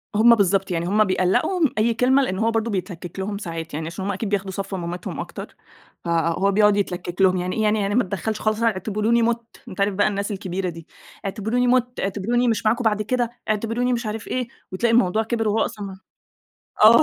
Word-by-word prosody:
هُم 235 +3 +7
بالضبط، 195 -2 +1
يعني 170 0 -1
هُم 210 +3 +4
بيقَلّقوا 185 - +1
من 310 -5 +4
أي 225 +2 +3
كلمة، 255 +4 +3
لإن 190 -7 -1
هو 225 +1 +2
برضو 225 0 0
بيتلكك 180 -3 -5
لهم 200 +1 -3
ساعات، 165 -5 -6
يعني 155 +2 -3
عشان 170 +3 -5
هُم 200 - 0
أكيد 200 +2 -3
بياخدوا 195 -1 -1
صف 195 +1 -4
مامتهم 175 0 -5
أكتر، - - -7 0.5
فهو 170 +3 +1
بيقعد 210 0 +4
يتلكك 180 -2 -2
لهم، 185 -1 +5
يعني 180 +1 -2
إيه 220 - 0
يعني، 215 0 +2
يعني 200 0 0
ما 250 - +4
اتدخلش 205 +3 -3
خالص، 215 +1 0
اعتبروني 215 +2 +1
مُتّ، 230 0 -1
أنت 185 - -5
عارف 200 0 +2
بقى 205 +2 +2
الناس 200 +1 -2
الكبيرة 185 -1 -3
دي، 165 -1 -10 0.4
اعتبروني 220 +5 0
مُتّ 250 0 +1
اعتبروني 220 +5 0
مش 225 -1 0
معاكم 230 +3 +2
بعد 215 -2 +2
كده، 240 +2 0 0.2
اعتبروني 230 +4 0
مش 235 0 -2
عارف 215 0 -4
إيه، 250 -2 -2 0.2
وتلاقي 230 +5 +1
الموضوع 220 -2 +3
كِبر 225 0 -1
وهو 210 +1 +1
أصلًا 210 -2 -6
ما 190 -1 -9 0.9
آه 230 +4 +9
210 Hz, 210 wpm, -23 LUFS, 190-230 Hz, 0.9 s, آه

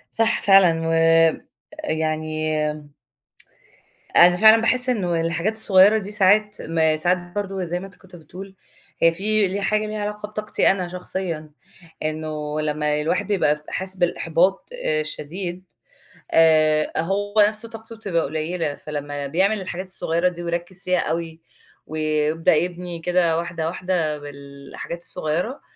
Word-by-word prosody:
صح 225 0 +1
فعلًا 175 -5 +5
وآآ، 165 0 +4 0.5
يعني 155 0 -2 1.7
أنا 175 +1 +7
فعلًا 220 +3 +7
باحس 250 +2 +2
إنّه 180 -9 0
الحاجات 170 +5 -1
الصغيّرة 210 -1 +5
دي 205 -1 -6
ساعات 210 +1 +3
ما 160 -1 +1
ساعات 175 +4 +2
برضه 190 +1 -5
زي 175 +1 -3
ما 195 - -8
أنت 195 - -16
كنت 185 -2 -15
بتقول، 185 +4 -11 0.5
هي 165 0 +6
في 210 +3 +1
لها 200 +2 -3
حاجة 215 +1 +1
ليها 215 0 -4
علاقة 210 0 -4
بطاقتي 215 0 0
أنا 185 -2 -1
شخصيًا، 175 -3 -5 0.5
إنّه 155 -1 -3
لمّا 150 0 -1
الواحد 180 +6 -1
بيبقى 150 -7 +1
حاسس 190 0 -5
بالإحباط 175 +1 +1 0.2
الشديد 160 +4 -3 0.7
آآ، 155 -1 +4
هو 200 +4 -2
نفْسُه 215 +2 -2
طاقته 225 0 -10
بتبقى 190 -7 -1
قليّلة 155 +1 -3
فلمّا 145 -1 -5
بيعمل 190 +8 +1
الحاجات 185 0 -5
الصغيّرة 170 -1 0
دي 175 -1 -8
ويركِّز 175 +2 -4
فيها 180 -1 +1
أوي، 165 0 -3 0.5
ويبدأ 155 +1 +1
يبني 175 +1 -3
كده 170 -1 +1
واحدة، 170 -1 -3
واحدة 170 -3 -1
بالحاجات 140 +3 -9
الصغيّرة، 175 - -3
175 Hz, 135 wpm, -22 LUFS, 155-195 Hz, 1.7 s, أنا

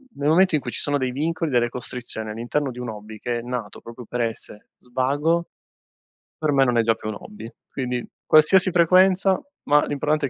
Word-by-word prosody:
nel 140 +1 -2
momento 180 +1 +4
in 150 - +1
cui 120 - -5
ci - - -3
sono 145 0 +1
dei 130 -2 -1
vincoli, 160 +3 -1
delle 120 -3 +2
costrizioni 120 -3 -6
all'interno 120 +6 -2
di 125 - -10
un 125 -1 -4
hobby, 110 0 -9
che 120 +1 -2
è - - -6
nato 120 -4 -5
proprio 120 +1 -10
per 120 +2 -3
essere 115 -2 -5
svago, 145 +7 0 0.9
per 155 -1 0
me 135 -1 +4
non 125 -2 +1
è 115 - +5
già 115 0 +2
più 110 - -8
un 110 - -4
hobby. 210 - -10 0.2
Quindi 125 -2 -3 0.2
qualsiasi 175 +5 +5
frequenza, 185 +2 +4 0.2
ma 145 0 +4
l'importante 145 +1 0
è - - -10
130 Hz, 205 wpm, -23 LUFS, 120-155 Hz, 0.9 s, è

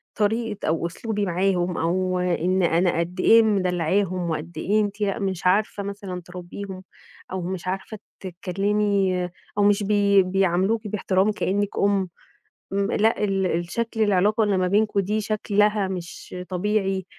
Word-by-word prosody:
طريقة 220 0 -1
أو 165 +1 0
أسلوبي 210 +3 -3
معاهم، 180 -1 0
أو 185 +2 0
إن 180 +1 +1
أنا 170 0 +2
قد 175 +2 -3
إيه 225 +4 +6
مدلعاهم 185 -2 0
وقد 160 +2 -4
إيه 205 +6 +1
أنتِ 205 0 -3
لأ 200 -2 0
مش 190 -3 -3
عارفة 200 +2 +2
مثلًا 200 -3 -6
تربيهم، 185 +2 -8 0.5
أو 190 - -3
مش 185 +1 -5
عارفة 195 +3 -4 0.2
تتكلّمي، 195 0 0 0.3
أو 205 - +3
مش 205 0 +3
بي 200 -1 +4
بيعاملوكِ 195 +4 +1
باحترام 195 0 +1
كأنِّك 205 0 -1
أم، 200 -2 +2 0.6
م 200 +1 0
لأ 220 0 +2
ال 195 -2 +1
الشكل 185 +7 -2
العلاقة 210 +1 +3
إن 205 -2 +1
ما 185 - +1
بينكم 205 +1 +2
دي 210 +3 0
شكلها 210 -1 +1
مش 180 -1 -7
طبيعي، 195 0 0
195 Hz, 145 wpm, -24 LUFS, 180-205 Hz, 0.6 s, إيه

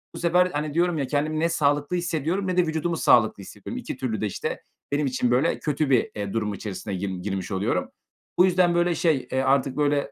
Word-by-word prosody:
bu - - -6
sefer, 175 +1 +3
hani, 150 0 -2
diyorum 175 +1 +1
ya, 140 -3 -1
kendimi 155 +2 -1
ne 165 +1 +2
sağlıklı 145 0 +1
hissediyorum 175 +2 -1
ne 180 -1 -1
de 180 - +4
vücudumu 160 +1 -1
sağlıklı 110 -8 +3
hissediyorum. - - -8
2 - - -6
türlü 115 -4 -3
de, - - 0
işte, 100 - -4 0.3
benim 145 +1 +1
için, 125 -2 0
böyle, 130 +7 +2
kötü 150 -1 -1
bir, 130 -4 +2
eee, 100 -2 -4
durum 105 -2 -1
içerisine 100 0 -6
girm 95 -1 -4
girmiş 95 0 -4
oluyorum. 95 +1 -1 0.5
Bu 180 - +7
yüzden, 180 -1 +3
böyle, 175 0 +2
şey, 155 -6 +1
eee, 130 - +1
artık, 135 0 +1
böyle, 145 -1 +1
145 Hz, 215 wpm, -25 LUFS, 115-170 Hz, 0.5 s, Bu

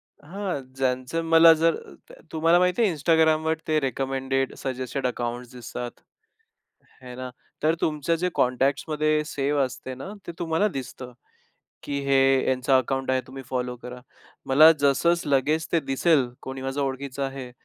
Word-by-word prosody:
हां, 180 -1 -6
ज्यांचं 130 +4 -1
मला 165 0 +8
जर 165 +1 +2
अ, - - -12 0.2
तर - - -15
तुम्हाला 165 +2 +3
माहिती 180 +4 +2
आहे 205 - +3
Instagram 160 +1 +3
वर 160 0 +2
ते 155 -1 +2
रिकमेंडेड, 135 0 -1
सजेस्टेड 130 0 -3
अकाउंट्स 120 0 -4
दिसतात, 120 0 -6 1.1
हे 125 -1 -9
ना. 130 0 -6 0.3
तर 160 +1 +3
तुमचं 150 +1 0
जे 180 - +2
कॉन्टॅक्ट्समध्ये 150 +4 +1
सेव 145 0 -1
असते 130 0 -7
ना, 135 +10 -8 0.2
ते - - -5
तुम्हाला 165 +5 +1
दिसतं, 130 -4 -7 0.7
की 140 -1 -3
हे 135 -1 +3 0.3
यांचं 130 +1 0
अकाउंट 135 +1 -1
आहे 130 0 +2
तुम्ही 135 +1 -9
फॉलो 125 -1 -2
करा. 125 0 -8 0.5
मला 155 +4 +8
जसच 145 +5 +2
लगेच 150 +4 +1
ते 165 - +3
दिसेल 135 -1 +2
कोणी 130 0 -7
माझ्या 135 +2 -2
ओळखीचं 135 0 -4
आहे, 135 -2 -6
135 Hz, 155 wpm, -25 LUFS, 130-160 Hz, 1.1 s, मला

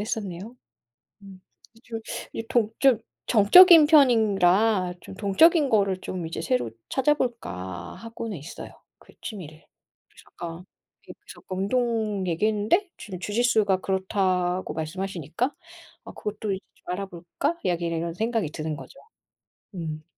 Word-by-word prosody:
했었네요. 210 +1 -5 0.7
음, 195 -2 -13 0.3
이 225 - -22
주로 230 -2 -6 0.3
이 225 - -4
동적 235 +1 +2 0.2
정적인 320 - +8
편이라 215 - +4
'좀 - - -11
동적인 280 - +4
거를 200 -4 +2
좀 180 -2 -5
이제 165 - -5
새로 125 -7 -1 0.2
찾아볼까?' 240 - -2
하고는 230 -3 -7
있어요, 150 +4 -9 0.3
그 - - -20
취미를. 160 -8 -9 0.4
그래서 - - -19
잠깐 170 +1 -7 0.4
그 - - -10
저 - - -12
운동 210 0 -1
얘기했는데 215 - +1
지금 190 -4 -8
주짓수가 210 -1 +1
그렇다고 185 -1 -1
말씀하시니까 175 - -3 0.5
'아, - - -9
그것도 210 -1 -4
이제 190 - -4 0.2
좀 - - -9
알아볼까?' 195 - -4
여기 175 -1 0
이런 165 0 -3
생각이 220 -3 -1
드는 155 -1 -4
거죠. - - -12 0.8
음. 155 -3 -5
195 Hz, 280 characters per minute, -25 LUFS, 175-225 Hz, 0.8 s, 정적인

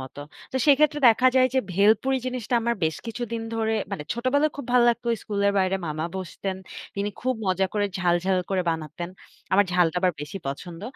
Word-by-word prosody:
মতো। 130 +2 -9 0.3
তো - - -1
সেক্ষেত্রে 295 +1 +4
দেখা 250 +3 +5
যায় 255 0 +5
যে, 265 - +4 0.2
ভেলপুরি 220 +7 +3
জিনিসটা 250 -1 -2
আমার 235 0 +1
বেশ 160 - 0
কিছুদিন 230 0 -4
ধরে, 225 0 0 0.2
মানে 150 - -4
ছোটবেলায় 285 +6 +1
খুব 285 - -6
ভালো 245 -1 +5
লাগতো। 240 0 0 0.2
স্কুলের 200 -1 0
বাইরে 190 0 +2
মামা 155 +2 -2
বসতেন। 190 +1 -4 0.4
তিনি 200 +1 -1
খুব 255 +1 0
মজা 190 +1 +2
করে 205 -1 +1
ঝাল, 175 -2 +2
ঝাল, 190 -1 +2
করে 190 -2 +1
বানাতেন। 165 +2 -5 0.4
আমার 200 +1 +5
ঝালটা 175 -1 +2
আবার 180 -1 +2
বেশি 150 +6 -6
পছন্দ। 165 +5 -6
200 Hz, 185 wpm, -25 LUFS, 180-245 Hz, 0.4 s, দেখা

